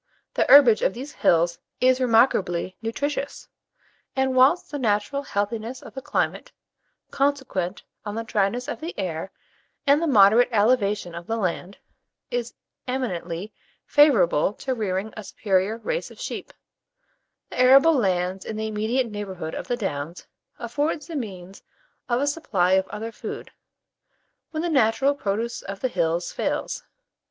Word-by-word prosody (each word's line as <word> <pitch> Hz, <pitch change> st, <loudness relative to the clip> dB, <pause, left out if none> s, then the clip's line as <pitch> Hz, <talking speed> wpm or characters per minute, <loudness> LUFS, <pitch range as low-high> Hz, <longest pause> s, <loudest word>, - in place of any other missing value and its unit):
The -, -, +1 dB
herbage 250 Hz, -7 st, +8 dB
of 190 Hz, -, +1 dB
these 270 Hz, +5 st, -7 dB
hills 170 Hz, -, +2 dB, 0.2 s
is 255 Hz, 0 st, +3 dB
remarkably 205 Hz, -7 st, +2 dB
nutritious; 280 Hz, +5 st, -3 dB, 0.7 s
and 265 Hz, -1 st, +1 dB
whilst 270 Hz, +8 st, +4 dB
the 290 Hz, -, -3 dB
natural 220 Hz, +4 st, 0 dB
healthiness 225 Hz, +1 st, -3 dB
of -, -, -11 dB
the 265 Hz, -, -6 dB
climate, -, -, -2 dB, 0.6 s
consequent 265 Hz, -10 st, -1 dB, 0.2 s
on 205 Hz, -1 st, -5 dB
the 230 Hz, -, -3 dB
dryness 225 Hz, +4 st, 0 dB
of 295 Hz, -, -4 dB
the 330 Hz, +3 st, -6 dB
air 185 Hz, -1 st, -3 dB, 0.5 s
and 285 Hz, +2 st, +4 dB
the 335 Hz, -, +1 dB
moderate 220 Hz, -2 st, +6 dB
elevation 210 Hz, -5 st, +2 dB
of 170 Hz, 0 st, -8 dB
the 225 Hz, -, -1 dB
land, 185 Hz, -1 st, -3 dB, 0.5 s
is -, -, -3 dB, 0.3 s
eminently 200 Hz, -7 st, -3 dB, 0.3 s
favourable 205 Hz, -, +4 dB
to 260 Hz, +4 st, -3 dB
rearing 205 Hz, -2 st, -2 dB
a 215 Hz, -, -7 dB
superior 195 Hz, +2 st, 0 dB
race -, -, -3 dB
of -, -, -15 dB
sheep, -, -, -6 dB, 1.0 s
the -, -, -6 dB
arable 275 Hz, +6 st, +7 dB
land 185 Hz, -, 0 dB
in 220 Hz, -, -5 dB
the 220 Hz, -, -2 dB
immediate 220 Hz, +4 st, 0 dB
neighbourhood 190 Hz, -6 st, -5 dB
of -, -, -5 dB
the 245 Hz, -, -1 dB
Downs 165 Hz, -, -4 dB, 0.3 s
affords 290 Hz, +6 st, -2 dB
the 335 Hz, -, -7 dB
means 195 Hz, -7 st, -6 dB, 0.5 s
of 240 Hz, 0 st, +2 dB
a -, -, +2 dB
supply 225 Hz, -, 0 dB
of 190 Hz, 0 st, +3 dB
other 220 Hz, +2 st, -6 dB
food, -, -, -7 dB, 1.0 s
when 315 Hz, 0 st, -3 dB
the -, -, 0 dB
natural 270 Hz, 0 st, +3 dB
produce 230 Hz, -2 st, -3 dB
of 195 Hz, 0 st, -7 dB
the 255 Hz, -, -1 dB
hills 170 Hz, -3 st, -1 dB
fails. -, -, -3 dB
225 Hz, 145 wpm, -24 LUFS, 190-265 Hz, 1.0 s, herbage